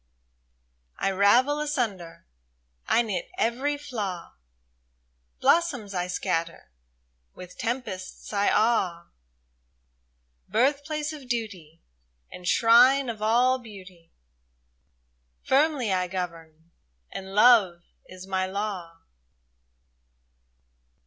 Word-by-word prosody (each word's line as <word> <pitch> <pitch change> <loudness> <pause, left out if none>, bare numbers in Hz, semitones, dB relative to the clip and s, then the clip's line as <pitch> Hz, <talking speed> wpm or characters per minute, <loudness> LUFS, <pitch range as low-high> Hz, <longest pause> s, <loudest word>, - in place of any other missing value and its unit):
I 195 - 0
ravel 240 +10 +3
asunder, 230 - -3 0.6
I 235 - +3
knit 195 -6 -4
every 265 +6 0
flaw; 210 -12 -6 1.1
Blossoms 275 -12 +1
I 180 -1 -2
scatter, 170 - -3 0.6
with 180 0 -11
tempests 230 -7 -5
I 205 0 +2
awe; 190 -7 0 1.4
Birthplace 290 +7 0
of 275 -5 -11
duty, 190 -9 -5 0.5
And 180 - -9
shrine 245 +6 +5
of 220 -2 -6
all 245 +4 +3
beauty, 185 -7 -14 0.7
— - - -45
Firmly 270 -6 +2
I 180 -1 0
govern, 165 -3 -7 0.4
and 190 0 -8
love 205 -7 +5 0.2
is 185 0 -11
my 190 -1 -1
law 185 -4 -5
200 Hz, 90 wpm, -26 LUFS, 180-250 Hz, 1.4 s, shrine